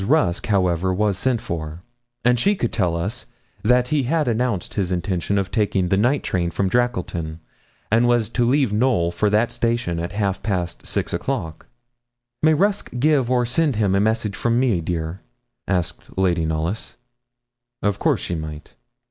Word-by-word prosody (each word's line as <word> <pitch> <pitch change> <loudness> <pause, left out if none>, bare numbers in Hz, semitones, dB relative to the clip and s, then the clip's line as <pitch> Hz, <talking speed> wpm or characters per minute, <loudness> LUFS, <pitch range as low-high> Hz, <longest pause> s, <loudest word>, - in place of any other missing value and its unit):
Rusk, 100 - +2
however, 95 -3 +2
was 100 +1 +1
sent 120 +3 0
for, 85 -6 -5 0.4
and 125 0 +4
she 200 - +3
could 120 - -2
tell 90 -7 +1
us 100 +8 -4 0.3
that 125 +2 +3
he 150 -2 +2
had 150 +3 0
announced 120 -4 -1
his 95 -3 -1
intention 90 +2 -1
of 95 -1 -1
taking 100 -4 +1
the 95 - +3
night 125 +8 +2
train 85 -2 0
from 95 +2 0
Drackleton, 90 -9 -1 0.5
and 115 +2 +4
was 120 -3 +3
to 120 - 0
leave 130 -2 +2
Knowl 105 -7 +2
for 105 +5 +1
that 110 +3 +2
station 115 -8 -1
at 85 +3 -4
half 100 -2 -1
past 90 -5 -3
six - - -2
o'clock. 80 -1 -3 0.7
'May 155 0 +5
Rusk 200 +5 +1
give 140 -2 +3
or 125 -1 +2
send 140 +3 +1
him 105 -3 +1
a 100 - +3
message 110 -1 0
from 120 0 +1
me, 120 -9 +2
dear?' 80 +2 -3 0.5
asked 90 -3 -3
Lady 90 -3 +2
Knollys. 80 +6 -3 0.9
Of 105 -1 0
course - - +1
she - - -3
might. 80 -2 -6
105 Hz, 170 wpm, -22 LUFS, 90-120 Hz, 0.9 s, May